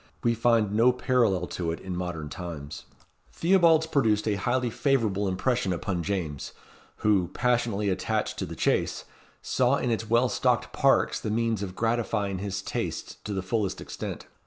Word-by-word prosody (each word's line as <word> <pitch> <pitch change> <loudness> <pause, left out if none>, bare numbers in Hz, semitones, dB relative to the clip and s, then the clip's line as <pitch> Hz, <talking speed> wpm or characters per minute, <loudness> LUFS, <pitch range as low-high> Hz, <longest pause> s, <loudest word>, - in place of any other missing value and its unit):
We 120 - +3
find 115 -2 +2
no 115 +4 +5
parallel 120 -8 +1
to 85 -2 -2
it 85 - -5
in 95 -1 -5
modern 90 -4 -4
times. 80 -4 -7 0.5
Theobalds 170 -3 +4
produced 110 -9 +1
a 105 - +2
highly 120 +4 0
favourable 110 -8 +1
impression 100 +2 0
upon 90 0 -2
James, 85 -7 -3 0.5
who, 100 -5 +4
passionately 120 -4 +1
attached 95 0 -1
to - - -2
the - - -7
chase, - - 0 0.4
saw 130 +1 +2
in 125 -3 -1
its 110 -1 -2
well 120 +2 +4
stocked - - 0
parks - - +3
the - - -4
means 115 -1 0
of 95 -2 -5
gratifying 110 -4 0
his 95 -1 -4
tastes - - -4
to 105 - -4
the 95 -2 -2
fullest 100 0 -1
extent. - - -6
105 Hz, 160 wpm, -27 LUFS, 95-120 Hz, 0.5 s, no